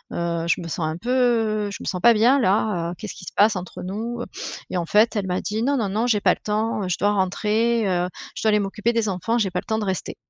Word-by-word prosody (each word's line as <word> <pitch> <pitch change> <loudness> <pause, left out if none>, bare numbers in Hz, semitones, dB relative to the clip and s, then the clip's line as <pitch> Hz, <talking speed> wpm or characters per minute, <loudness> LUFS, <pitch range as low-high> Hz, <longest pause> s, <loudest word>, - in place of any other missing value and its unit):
heu, 170 -1 -2
je 170 - +1
me 170 - -6
sens 160 0 -2
un 155 - -3
peu, 235 +7 -7
heu, 225 -5 +2
je - - -5
me - - -8
sens 180 - -2
pas 235 - +7
bien 240 +6 +4
là. 190 -5 +1
Heu, - - -5
qu'est-ce 215 - -7
qui - - -11
se - - -8
passe 210 +1 +4
entre 180 0 -7
nous, 225 +6 -4
heu?» - - -4 0.4
et - - -2
en 170 - -1
fait, 215 +6 +3
elle 195 -2 -1
m'a 180 0 -1
dit: 215 +2 -2
«Non, 280 +2 +1
non, 210 -5 -1
non, 220 +5 0
j'ai 210 -4 +2
pas - - +4
le - - -26
temps, 215 -2 -1
je 180 - -1
dois 205 0 +2
rentrer, 210 +3 +1
heu, 180 -1 +1 0.3
je - - -5
dois 220 - +4
aller 210 0 +4
m'occuper 210 +4 -1
des 225 -3 +1
enfants, 210 +6 -1
j'ai 195 -5 0
pas 180 - -1
le - - -9
temps 220 0 -1
de 210 - -2
rester». 190 -3 -3
210 Hz, 290 wpm, -23 LUFS, 185-225 Hz, 0.4 s, pas